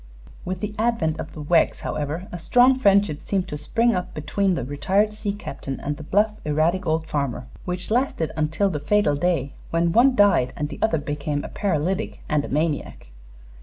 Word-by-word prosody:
With 185 0 -4
the 210 0 -3
advent 220 -9 +1
of - - -6
the 150 - -7
Weggs, 165 +2 +2
however, 155 +5 -3
a 175 - -6
strong 245 +9 +5
friendship 200 - +3
seemed 190 -2 -1
to - - -4
spring 230 +11 +1
up 180 -1 -3
between 185 +5 0
the 135 - -2
retired 190 +10 +1
sea 210 -1 -3
captain 140 -9 -6
and 145 +1 -3
the - - -9
bluff, 205 +8 +2
erratic 165 +5 +1
old 160 0 +1
farmer, 140 -5 -2 0.2
which 180 +2 -4
lasted 235 - 0
until 160 +6 +1
the 150 - -2
fatal 205 +1 +2
day 150 -3 0 0.2
when 170 0 +1
one 250 +7 +5
died 200 - +4
and 150 0 -3
the - - -8
other 220 -7 +2
became 145 0 -3
a - - -6
paralytic 190 +2 -1
and 150 -2 +1
a - - -6
maniac. 150 - -2
170 Hz, 190 wpm, -23 LUFS, 150-205 Hz, 0.2 s, strong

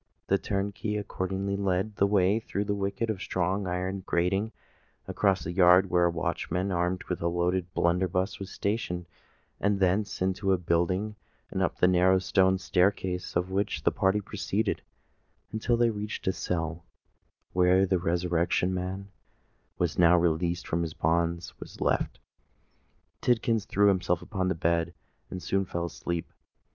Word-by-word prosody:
The 100 - +3
turnkey 100 +1 -2
accordingly 100 -1 -2
led 100 +1 -1
the 100 - +4
way 100 +1 +3
through 100 -2 -3
the 100 - 0
wicket 100 +3 -1
of 105 - -4
a - - -13
strong 95 +2 -1
iron 90 +2 -2
grating, 95 +6 0 0.6
across 95 -2 +1
a 85 - -3
yard 90 +1 +5
where 90 -1 +4
a - - +4
watchman 90 +3 -2
armed 90 +1 0
with 90 - -4
a 85 - +1
loaded 85 +1 0
blunderbuss 90 +2 +1
was 100 -1 -6
stationed, 95 -5 -2 0.5
and 100 0 +1
thence 95 +1 +1
into 95 +1 +1
a - - +3
building, 90 +5 0 0.4
up - - 0
the 90 - +4
narrow 90 +1 +4
stone 95 0 +3
staircase 90 0 0
of 90 +2 0
which 100 +1 -1
the - - +3
party 95 +2 +1
proceeded, 105 +1 -2 0.7
until 115 +2 0
they 120 -1 +3
reached 105 0 -5
a 95 - +3
cell, 80 -2 -3 0.7
where 90 +1 +4
the 95 -1 +1
Resurrection 90 +1 +1
Man, 95 +1 -3
who - - -15 0.7
was 85 -2 -1
now 90 0 +6
released 85 +1 0
from 85 - 0
his 80 -2 -4
bonds, 85 +1 0
was - - -10
left. - - 0 1.0
Tidkins 115 -3 +1
threw 100 +1 +4
himself 90 -2 +1
upon 95 -2 -2
the 95 - 0
bed 85 +1 0 0.3
and 90 - -6
soon 95 0 +1
fell 85 -2 -3
asleep. 85 0 -4
95 Hz, 155 wpm, -28 LUFS, 90-100 Hz, 1.0 s, now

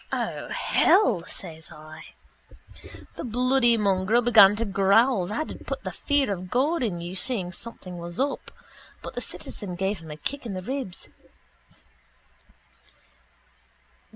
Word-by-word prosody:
—O - - -3
hell! 230 - +3
says 160 0 -8
I. 155 0 -12 1.0
The - - -5
bloody 245 0 +3
mongrel 200 +3 +2
began 210 -4 +7
to 230 +2 -1
growl 200 +1 +3
that'd 235 +11 -5
put - - -4
the - - -4
fear 285 -7 +1
of 185 -1 -7
God 285 - +1
in 190 -8 -2
you 175 +1 -6
seeing 190 -2 -1
something 185 -4 -8
was 170 0 -5
up 280 +1 -1 0.5
but - - -7
the - - -4
citizen 190 -4 -6
gave 190 +1 -1
him 160 -1 -12
a 150 - -7
kick 280 - -4
in 200 - -4
the 185 - -5
ribs. 255 -5 -4
200 Hz, 135 wpm, -26 LUFS, 180-245 Hz, 1.0 s, began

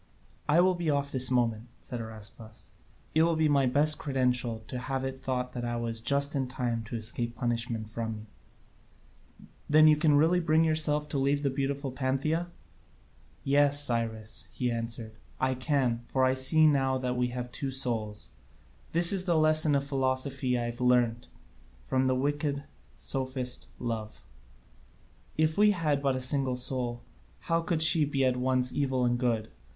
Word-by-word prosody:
"I 160 +4 +5
will 185 +1 +3
be 175 -3 -2
off 140 -1 0
this 130 -1 +3
moment," 120 -2 0
said 120 -2 -6
Araspas; 110 0 -10 0.4
"it 160 - +3
will 165 0 +3
be 160 -1 +2
my 140 -3 +3
best 150 +4 +3
credential 125 -5 0
to 125 - -5
have 135 +1 -3
it 135 0 -5
thought 125 -1 -3
I 120 -1 -3
was 115 -1 -3
just 140 +3 +1
in 135 -3 -1
time 120 -3 -3
to 115 - -6
escape 115 +1 -3
punishment 115 -2 -2
from 110 0 -4
you." 105 0 -10 1.4
"Then 155 +1 +6
you 155 - +6
can 150 -1 +3
really 165 +4 +3
bring 160 -1 +2
yourself 155 -2 +1
to 140 - -1
leave 140 +2 +1
the 140 - +1
beautiful 135 0 -3
Pantheia?" 140 +6 -1 1.0
"Yes, 145 +1 +3
Cyrus," 115 -4 -3
he 125 -1 -2
answered, 115 -1 -5 0.2
"I 130 0 +1
can; 130 -3 0
for 130 - 0
I 130 - +3
see 130 +4 +4
now 135 -3 +2
that 125 -1 -2
we 125 0 0
have 125 0 -6
two 140 - -4
souls. 115 -6 -2 0.6
This 170 +3 +7
is 185 -1 +1
the 170 -3 +2
lesson 155 -1 +3
of 140 - +1
philosophy 130 -1 -1
that 120 - -1
I - - -2
have 120 +1 -6
learnt 120 -2 +2 0.6
from 130 - 0
the 130 0 +2
wicked 145 +1 -1 0.3
sophist 130 -2 -2
Love. 115 -3 -5 1.1
If 155 +3 +1
we 210 0 +6
had 155 -8 0
but 135 -2 +1
a 130 - -3
single 130 -1 +1
soul, 125 -1 -2 0.4
how 165 0 0
could 165 -1 0
she 160 -1 +5
be 140 -2 0
at 130 -1 +2
once 125 0 0
evil 130 -3 0
and 120 0 0
good? 115 -3 -1
130 Hz, 170 wpm, -29 LUFS, 120-145 Hz, 1.4 s, This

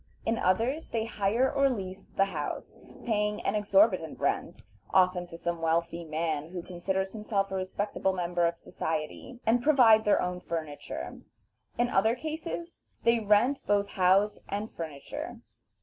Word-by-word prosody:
In 225 +1 +1
others 230 - +1
they 225 -1 -1
hire 225 +3 +1
or 275 0 +3
lease 195 -5 -5
the 195 - +2
house, 195 - -5 0.3
paying 210 -2 0
an 195 - 0
exorbitant 200 -5 +3
rent - - -1 0.3
(often 180 -1 +3
to 165 - -9
some 170 0 -3
wealthy 170 +1 0
man 155 -1 -2
who 175 -1 -6
considers 190 +2 -2
himself 210 -2 -1
a - - -2
respectable 190 +1 -1
member 175 -2 +1
of 170 0 -3
society), 160 +11 -4
and 230 +2 +3
provide 240 -6 +6
their 210 - +4
own 180 0 -2
furniture; 160 -4 -5 0.6
in 240 - +3
other 220 +4 +3
cases 320 +4 -5 0.2
they 235 0 +4
rent 220 +6 +3
both 200 -1 +2
house 190 +3 +3
and 205 +2 -3
furniture. 155 -4 -7
195 Hz, 150 wpm, -29 LUFS, 175-225 Hz, 0.6 s, provide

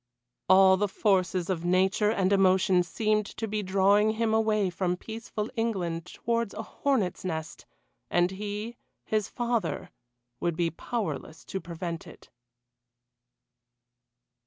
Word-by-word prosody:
All 190 0 +7
the 205 +2 +1
forces 185 -3 +1
of 170 -3 -2
nature 190 +4 +2
and 195 -3 +2
emotion 190 -1 +4
seemed 215 +3 0
to 225 - -2
be 215 0 -2
drawing 200 +2 +3
him 220 0 0
away 215 -3 +2
from 180 0 -1
peaceful 220 +1 -5
England 180 -8 -2
towards 230 +1 -2
a 220 - -4
hornets' 225 -6 -1
nest, 160 -3 -5 0.4
and 175 +1 +2
he 210 +4 -5 0.3
his 215 -2 0
father 230 -7 -2 0.5
would 170 -2 -1
be 170 -1 0
powerless 205 -4 -4
to 190 - -4
prevent 170 0 -5
it. - - -15
195 Hz, 125 wpm, -28 LUFS, 180-215 Hz, 0.5 s, All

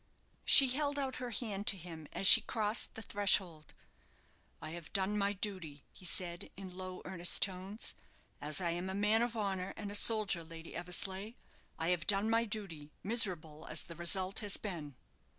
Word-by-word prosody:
She 270 -2 +9
held 285 +2 -1
out 270 -2 -4
her 250 -1 -6
hand 210 -3 -6
to 195 - 0
him 165 -3 -11
as 195 - -2
she - - +11
crossed 215 0 -1
the 220 - -8
threshold. 190 -6 +1 0.8
"I - - -7
have 170 -1 -10
done 195 +1 -1
my 200 -1 0
duty," 185 -8 -5
he 185 - -13
said, 175 -1 -4
in 190 -2 -10
low, 185 0 -8
earnest 175 -2 +1
tones, 190 +3 -3 0.5
"as 150 +3 +1
I 175 -2 -1
am 175 +2 -5
a 190 - -5
man 210 +3 +1
of 235 -1 -3
honour 195 -3 -4
and 205 -2 -7
a - - -8
soldier, 205 -5 +3
Lady 165 0 -12
Eversleigh; 190 +4 0 0.4
I 165 - -2
have 175 -3 -2
done 205 +2 +2
my 230 +1 +1
duty, 195 -9 -6
miserable 180 -8 -2
as 155 - -4
the 170 - -11
result 185 +4 +2
has 205 -2 -3
been." 160 -9 -8
190 Hz, 180 wpm, -33 LUFS, 170-210 Hz, 0.8 s, she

